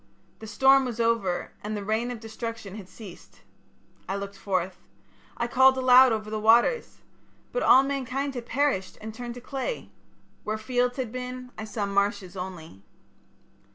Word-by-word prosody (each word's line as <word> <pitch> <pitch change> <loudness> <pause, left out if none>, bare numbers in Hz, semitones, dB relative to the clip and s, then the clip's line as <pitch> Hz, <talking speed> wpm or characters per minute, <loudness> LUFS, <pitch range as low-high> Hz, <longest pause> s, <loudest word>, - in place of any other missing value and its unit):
The 220 - -9
storm 265 +5 +5
was 240 -3 -4
over 230 -6 0
and 210 0 -3
the 200 - -6
rain 220 +3 0
of 245 -2 -5
destruction 225 -2 -6
had 200 -3 -9
ceased. 195 -5 -13 0.7
I 195 - -1
looked 200 0 -5
forth. 190 -2 -2 0.6
I 235 - 0
called 265 +2 +5
aloud 255 0 +7
over 215 -1 -3
the 215 - -2
waters. 235 - +3 0.5
But - - -1
all 265 - +7
mankind 275 0 -2
had 240 -2 -6
perished 265 -8 0
and 220 0 -7
turned 240 +1 -7
to 245 - -9
clay. 275 - -4 0.5
Where 215 +1 -2
fields 245 +3 0
had 250 -4 -3
been 250 0 -6
I 215 - -6
saw 210 -1 -3
marshes 200 -2 -1
only. 180 - -8
230 Hz, 160 wpm, -26 LUFS, 200-255 Hz, 0.7 s, aloud